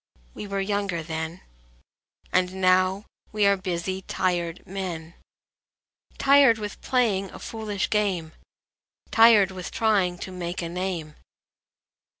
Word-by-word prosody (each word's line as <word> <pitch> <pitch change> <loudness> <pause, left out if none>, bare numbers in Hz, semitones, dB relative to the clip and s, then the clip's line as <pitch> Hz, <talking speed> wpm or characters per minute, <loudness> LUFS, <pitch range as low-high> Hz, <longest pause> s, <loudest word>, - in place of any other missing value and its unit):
We 210 - -7
were 200 0 -2
younger 195 -4 -1
then, 160 +2 -5 0.9
And 185 0 +2
now 185 +2 +2 0.3
we 210 -1 +2
are 200 0 +5
busy, 185 0 -3
tired 175 -2 -2
men: 175 -4 -5 1.0
Tired 275 -4 +6
with 210 -2 -7
playing 215 -7 +1
a - - -10
foolish 215 -3 -3
game, 190 -7 0 0.8
Tired 225 -4 +6
with 185 -2 -6
trying 200 -5 +1
to 185 - -7
make 180 -1 -4
a 165 - -4
name. 175 -4 -4
190 Hz, 120 wpm, -25 LUFS, 175-205 Hz, 1.0 s, Tired